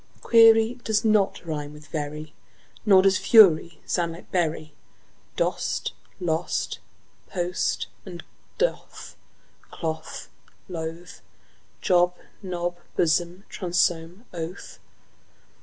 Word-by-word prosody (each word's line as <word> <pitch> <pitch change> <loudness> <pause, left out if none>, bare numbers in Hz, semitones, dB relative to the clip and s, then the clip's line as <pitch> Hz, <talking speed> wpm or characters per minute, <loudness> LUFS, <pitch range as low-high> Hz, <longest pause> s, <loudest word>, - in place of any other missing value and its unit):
Query 225 +1 +5
does 220 0 0
not 210 -4 +2
rime 150 -2 -4
with 150 0 -13
very, 150 0 -5 0.5
Nor 190 -2 +7
does 195 -1 +4
fury 170 -7 +6
sound 170 -2 -1
like 165 - -13
bury. 155 -3 -1 0.6
Dost, - - -1 0.3
lost, 165 -2 -2 0.5
post 180 -1 -1 0.2
and 175 -3 -9 0.3
doth, - - -3 0.5
cloth, 160 -1 -5 0.4
loth; 165 0 -7 0.6
Job, 180 -1 +3 0.3
Job, 175 -1 -3 0.2
blossom, 175 +2 +1 0.2
bosom, 175 +2 0
oath. 170 +2 -7
175 Hz, 90 wpm, -25 LUFS, 160-190 Hz, 0.6 s, Nor